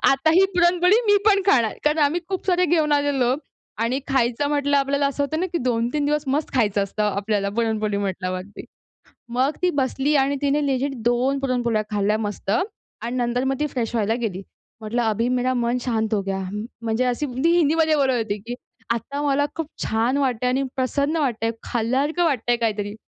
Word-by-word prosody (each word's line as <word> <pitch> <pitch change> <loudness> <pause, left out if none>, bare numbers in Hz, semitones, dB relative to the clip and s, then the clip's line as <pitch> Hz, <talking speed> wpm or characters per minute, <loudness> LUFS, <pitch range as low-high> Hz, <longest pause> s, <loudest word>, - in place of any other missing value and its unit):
आता 275 +3 +3
ही 375 +2 +6
पुरणपोळी 355 +2 +4
मी 410 0 +5
पण 400 -2 +5
खाणार. 235 - +3
कारण 300 +1 +2
आम्ही 310 +5 +1
खूप 380 -1 -4
सारे 360 -1 +3
घेऊन 310 -2 +2
आलेलो 280 -4 +2 0.5
आणि 250 +4 0
खायचं 265 +1 +1
म्हटलं 285 -1 +1
आपल्याला 280 +1 +1
असं 280 +1 -1
होतं 315 +3 -2
ना, 370 - 0
की 340 - 0
2-3 245 +3 0
दिवस 300 0 0
मस्त 285 +3 -1
खायचं 210 -5 +2
असतं, 200 +2 -3
आपल्याला 205 0 0
पुरणपोळी 215 -3 0
म्हटल्यावरती. 185 0 -4 0.8
मग 275 +4 +2
ती 360 - +3
बसली 270 +3 0
आणि 280 +1 0
तिने 285 +1 +1
लेजिट 275 0 -1
2 255 +3 +1
पुरणपोळ्या 245 -5 0
खाल्ल्या 210 +1 +1
मस्त. 205 -1 -7 0.5
आणि 240 +2 -4
नंतर 245 0 0
मग - - 0
ती 300 - +1
फ्रेश 235 -3 -2
व्हायला 220 0 +1
गेली. 190 -3 -4 0.4
म्हटलं, 220 +3 -1
"अभी 225 +1 0
मेरा 255 0 +1
मन 240 0 0
शांत 220 -3 -1
हो 205 - +1
गया." 195 0 -3 0.4
म्हणजे 230 +2 0
अशी 250 +4 0 0.2
ती 335 - +4
हिंदीमध्ये 320 0 +3
बोलत 270 -3 +2
होती, 220 -3 -2
की 240 +1 -4 0.4
आता 280 +5 -4
मला 285 0 +2
खूप 325 -3 -3 0.2
छान 230 +5 +1
वाटतंय 250 -3 0
आणि 265 +2 +1
प्रसन्न 280 +4 0
वाटतंय 235 -6 0
खाल्ल्यासारखं 265 +9 0
वाटतंय 245 -6 +1
काहीतरी. 205 -2 -1
255 Hz, 180 wpm, -23 LUFS, 225-290 Hz, 0.8 s, ही